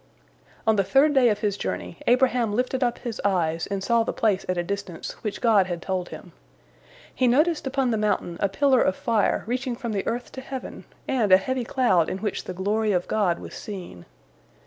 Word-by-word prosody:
" - - -30
On 220 -1 +3
the 195 - +3
third 275 +8 +4
day 260 -3 +5
of 210 -1 -1
his 205 -2 0
journey, 170 - -4
Abraham 245 -3 +3
lifted 255 +2 0
up 240 -1 0
his 235 -3 -6
eyes 165 -5 0
and 200 -1 -3
saw 235 +2 +3
the 225 - -1
place 205 -4 +1
at 185 - 0
a 175 - 0
distance, 195 -2 -5
which 210 -3 -4
God 210 -5 +4
had 175 -2 -3
told 185 0 -3
him. - - -10 0.8
He 255 - +1
noticed 300 +4 +2
upon 265 -2 0
the 220 - +1
mountain 205 -5 -1
a 200 - +1
pillar 265 +4 +3
of 185 - +2
fire 225 -4 +1
reaching 250 +2 -2
from 235 -2 -5
the 200 -2 -2
earth 240 +1 -3
to 260 - -8
heaven, 265 -1 -7 0.2
and 230 -7 +1
a 185 - +10
heavy 250 +5 -2
cloud 190 -11 +2
in - - -3
which 205 0 -3
the 185 - -5
glory 210 +3 0
of 180 -1 0
God 195 -6 +1
was - - -10
seen. 180 - -8
215 Hz, 215 wpm, -25 LUFS, 190-250 Hz, 0.8 s, a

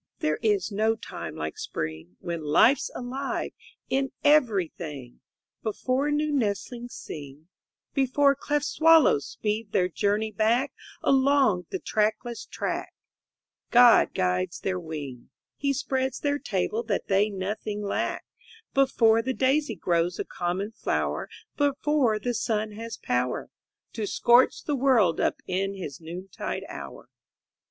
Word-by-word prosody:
There 155 0 -1
is 210 -2 +1
no 220 +2 +2
time - - -7
like 75 0 -5
Spring, 80 +3 -5
When 170 -1 -4
life's 220 - +4
alive 260 +2 -3 0.4
in 270 0 0
everything, 175 - +1 0.4
Before 255 +6 -1
new 300 +1 +1
nestlings 240 -1 -2
sing, 145 +2 -9 0.4
Before 275 +1 +3
cleft 290 +1 -1
swallows 315 - +5
speed 210 0 -3
their 180 -2 +3
journey 205 +4 0
back 230 +6 +1 0.3
Along 265 - +3
the - - -2
trackless 220 +4 -1
track, - - -4 0.7
God 245 -1 +6
guides 180 -1 0
their 185 -1 -1
wing, 145 -7 -7 0.3
He 280 -1 0
spreads 265 -1 -1
their 285 0 0
table 205 +1 -1
that 220 -4 -2
they 200 +2 +3
nothing 205 +1 -4
lack, 200 - -2 0.5
Before 230 -4 +4
the 260 +3 -2
daisy 270 -2 +1
grows 170 0 0
a - - -3
common 185 +4 -3
flower, 225 - -2 0.3
Before 285 -4 +2
the 245 +3 -2
sun 215 -1 -1
has 225 +2 -7
power 125 0 -1 0.4
To 215 -2 -3
scorch 240 +4 +4
the 295 - -1
world 245 -10 +3
up - - 0
in 195 +2 -1
his 170 -6 -7
noontide 175 +4 -5
hour. - - -9
215 Hz, 130 wpm, -26 LUFS, 180-260 Hz, 0.7 s, God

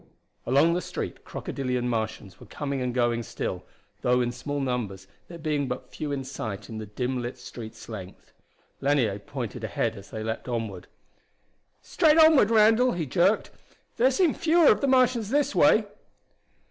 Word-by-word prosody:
Along 145 +6 +4
the 180 - 0
street - - -6
crocodilian 125 -2 -3
Martians 110 -5 -3
were - - -13
coming 140 -2 -4
and 125 -1 -1
going 120 -1 +1
still, 115 - -4 0.4
though 125 0 +3
in 120 -1 0
small 145 +4 -4
numbers, 120 -8 -3 0.2
there 170 - -9
being 150 -3 -1
but - - -6
few 150 -2 -5
in 140 -1 -2
sight 110 -7 -6
in 110 -1 -6
the 110 - -7
dim 125 +4 -2
lit 120 +1 -5
street's 110 -2 -10
length. 95 -5 -10 0.5
Lanier 130 -8 +1
pointed 120 0 -6
ahead 110 +1 -1
as 100 -1 -12
they 110 -1 -5
leaped 110 +2 -4
onward. 110 -6 -4 1.0
"Straight 315 -2 +3
onward, 315 -9 +7
Randall!" 225 +3 +5
he 170 -3 -2
jerked. 175 - +2 0.5
"There 250 +3 +5
seem 320 +3 +2
fewer 330 -1 +4
of 210 - +1
the 280 - +1
Martians 255 -5 +3
this 290 +3 +1
way!" - - +5
130 Hz, 165 wpm, -26 LUFS, -, 1.0 s, onward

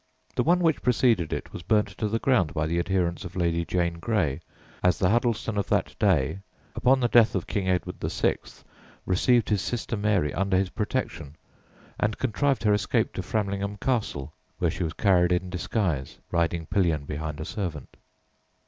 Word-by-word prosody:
The - - +2
one 175 +2 +3
which 160 -4 +2
preceded 115 -9 +2
it - - -4
was - - -6
burnt 105 +4 +2
to 110 - 0
the 110 +2 0
ground 110 - +1
by 80 -1 0
the 85 +2 0
adherents 90 0 0
of 90 -1 -8
Lady 85 -2 +1
Jane 85 -1 -1
Grey, 85 - 0 0.4
as 90 -1 +3
the 90 0 +2
Huddleston 115 -2 0
of 100 - -3
that - - +1
day, 80 -4 +2 0.3
upon 130 +1 +3
the 120 - +2
death 115 -2 +5
of 95 - -1
King 95 -2 -2
Edward 90 -1 -1
VI., - - 0 0.7
received 115 +5 +2
his 105 -3 +2
sister 115 +3 -3
Mary 100 -7 +1
under 95 +1 +1
his 95 -1 0
protection, 105 - -3 0.6
and 105 0 0
contrived 130 +2 0
her 105 -1 +4
escape 105 - 0
to - - -3
Framlingham 100 -1 -2
Castle, 105 - -2 0.2
where - - +1
she - - -6
was 80 -1 -2
carried 90 -1 +3
in 90 +1 0
disguise, 90 - -2
riding 85 0 0
pillion 80 -6 +1
behind 75 +1 -5
a 80 - -4
servant. 90 - -5
95 Hz, 175 wpm, -26 LUFS, 85-110 Hz, 0.7 s, death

